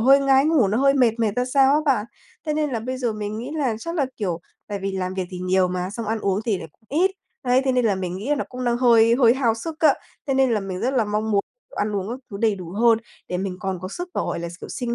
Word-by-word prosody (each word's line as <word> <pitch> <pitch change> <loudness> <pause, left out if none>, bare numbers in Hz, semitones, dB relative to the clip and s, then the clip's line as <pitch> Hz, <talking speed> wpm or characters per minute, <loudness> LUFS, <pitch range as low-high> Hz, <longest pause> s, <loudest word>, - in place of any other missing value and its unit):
hơi 270 +4 +6
ngái 270 0 +4
ngủ 300 -9 +3
nó 215 +5 +1
hơi 275 0 +4
mệt 240 -4 +3
mệt 220 -3 +1
ra 250 - +2
sao 270 +1 +4
á 300 - +3
bạn. 260 -8 +2 0.4
Thế 305 - 0
nên 300 -1 0
là 235 -3 -2
bây 255 +3 -4
giờ 245 -3 -1
mình 210 0 -4
nghĩ 245 +5 -5
là 260 -7 0
chắc 335 +8 -5
là, 290 -6 +1
kiểu, 180 -6 -2 0.3
tại 205 -1 -4
vì 195 0 -3
làm 185 -1 -3
việc 190 - -2
thì 180 - -6
nhiều 185 0 +2
mà, 180 0 -3
xong 230 +1 -5
ăn 220 +1 -1
uống 195 0 0
thì 215 -5 0
lại 165 - -8 0.2
ít, 355 +7 +2 0.3
đấy, 250 +1 +3
thế 265 - +2
nên 250 -1 +2
là 210 -3 +3
mình 185 -1 -4
nghĩ 210 +8 -6
là 295 - +3
nó 285 - -2
cũng 255 0 -6
đang 240 -1 +2
hơi 230 -2 +5
hơi 240 -2 +5
hao 245 -4 +2
sức 310 +8 -6
á. 300 -4 +5 0.3
Thế 270 - +1
nên 265 -1 +3
là 215 - +1
mình 190 -2 -5
rất 260 +3 0
là 240 -4 +3
mong 210 +1 -1
muốn 200 -2 +3 0.4
ăn 205 0 -1
uống 195 0 -3
các 245 +3 -4
thứ 200 - -5
đầy 220 -2 +3
đủ 180 -4 -8
hơn 225 +3 +4 0.3
để 180 - -2
mình 190 -1 -3
còn 190 -2 -2
có 185 - -5
sức 355 - -6
và, - - 0
gọi - - -3
là, 170 0 -4
kiểu - - -8
sinh 240 -2 -3
230 Hz, 300 wpm, -23 LUFS, 195-265 Hz, 0.4 s, hơi